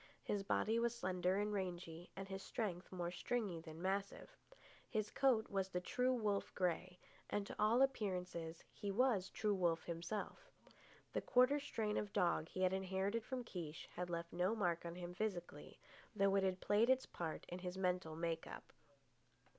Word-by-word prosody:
His 205 - 0
body 220 +3 +2
was 235 0 +1
slender 185 -3 +1
and 205 +1 +1
rangy, 175 -3 -3
and 195 0 -5
his 190 0 -4
strength 195 -5 -3
more 175 -2 -2
stringy 200 -2 -1
than 160 -1 -9
massive, 195 - -2 0.5
His 215 -3 -1
coat 250 -5 +4
was 195 -1 0
the 180 - -1
true 250 +8 +1
wolf 210 -4 0
grey, 180 0 0 0.3
and 205 -1 0
to - - -7
all 225 +5 +6
appearances 180 -9 -1
he 205 - -4
was 205 -3 +3
true 210 -1 +1
wolf 175 -4 +2
himself. 170 +5 -4 0.6
The - - +1
quarter 255 +4 +5
strain 220 -7 -1
of 205 -1 -2
dog 170 -4 +2
he 185 - -1
had 185 0 +4
inherited 190 +3 0
from 255 0 -3
Kiche 170 -8 -6
had 180 0 -2
left 170 0 -3
no 180 +5 +2
mark 175 -5 +1
on 170 - -5
him 175 0 -5
physically, 185 -3 -4 0.4
though 195 -1 +4
it 195 - +5
had 190 -1 +1
played 215 +4 +4
its 260 0 +4
part 165 -2 -4
in 180 - -4
his 180 0 -4
mental 180 -4 0
make 165 0 -1
up. - - -9
190 Hz, 175 wpm, -40 LUFS, 175-215 Hz, 0.6 s, all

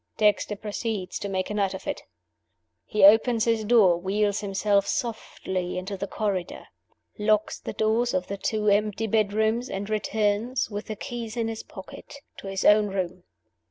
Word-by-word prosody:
Dexter 210 0 +2
proceeds 210 -1 -4
to 200 - -4
make 190 +1 -2
a - - -2
night 200 -2 0
of - - -9
it. - - -3 0.9
He 210 -2 0
opens 225 +3 +6
his 230 -2 +1
door; 205 -6 +5
wheels 205 +2 0
himself 200 0 +1
softly 190 -6 -3
into 190 +2 -4
the 200 +1 -4
corridor; 195 -5 -3 0.5
locks 215 0 +1
the - - -6
doors 225 +2 +1
of 180 0 0
the 200 - -4
two 210 +1 -1
empty 210 +1 +2
bedrooms, 220 +3 +1
and 195 +1 -4
returns 215 +3 0
(with 205 +1 -5
the 215 - -4
keys 240 -1 -6
in 225 -1 0
his 225 -1 -5
pocket) 275 +11 -11 0.2
to - - -9
his 195 0 -3
own 210 0 +6
room. 185 -2 -4
210 Hz, 165 wpm, -26 LUFS, 195-220 Hz, 0.9 s, opens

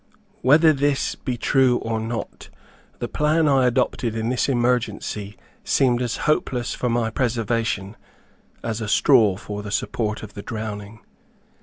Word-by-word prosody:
Whether 155 +4 +6
this 140 -1 0
be 125 -3 -4
true 130 0 +3
or 115 -1 -2
not, 115 +1 -5 0.5
the - - -3
plan 155 +2 +1
which 145 - +3
I 130 -2 +4
adopted 120 -2 0
in 110 +1 -1
this 125 +2 0
emergency 120 -5 -1 0.3
seemed 125 -2 +2
as 120 -3 -2
hopeless 130 -5 0
for 125 - -2
my 115 -1 0
preservation, 115 -4 -1 0.7
as 115 -1 -3
a 110 - -3
straw 110 -4 +4
for 105 0 -6
the 105 - -7
support 105 +1 -2
of 105 - -9
the 100 - -7
drowning. 105 -1 -6
115 Hz, 150 wpm, -23 LUFS, 110-130 Hz, 0.7 s, Whether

